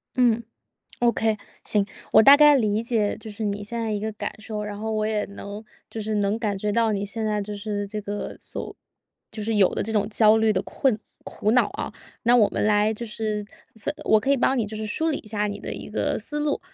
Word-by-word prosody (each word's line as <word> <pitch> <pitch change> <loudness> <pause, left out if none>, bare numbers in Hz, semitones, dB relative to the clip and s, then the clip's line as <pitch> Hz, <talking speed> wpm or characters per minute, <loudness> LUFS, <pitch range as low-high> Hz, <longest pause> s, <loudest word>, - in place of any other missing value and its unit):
嗯 240 -2 +3 0.6
，OK， 225 -2 +2 0.3
行。 205 -2 +1 0.3
我 - - +8
大 280 +4 +10
概 295 -1 +7
理 215 -3 +1
解 225 -3 0
就 220 - -10
是 215 +1 -6
你 205 0 -2
现 235 +3 -4
在 225 -1 -1
一 205 - -1
个 220 +1 -3
感 - - -4
受， 210 -1 -4
然 205 -1 -5
后 220 0 -3
我 215 0 0
也 215 -1 0
能 200 +2 -8 0.3
就 220 - -5
是 215 0 -2
能 205 +1 +1
感 205 -4 -1
觉 210 +1 -1
到 225 0 +2
你 200 0 -1
现 220 +2 -4
在 210 -1 0
就 205 +1 -5
是 205 0 -3
这 210 +1 -5
个 205 0 -5
所 - - -6 0.6
就 215 - -6
是 225 0 -1
有 195 -3 +4
的 - - 0
这 220 - -3
种 205 -1 +2
焦 215 0 +5
虑 220 -1 +3
的 185 -1 0
困 255 -6 0 0.3
苦 215 - -1
恼 250 - +4
啊， - - -5 0.3
那 240 +1 +5
我 215 -4 +5
们 - - -1
来 210 +1 +3
就 235 +2 -6
是 215 -1 -3 0.3
分 205 - -3
我 220 - +5
可 270 +5 0
以 280 - +4
帮 260 +2 +2
你 225 - +1
就 215 - -7
是 215 0 -4
梳 320 +9 0
理 295 - 0
一 215 - -13
下 210 -1 -1
你 205 0 -5
的 - - -6
一 - - -8
个 210 - -1
思 295 +7 -3
路。 295 -1 0
215 Hz, 265 characters per minute, -24 LUFS, 205-225 Hz, 0.6 s, 大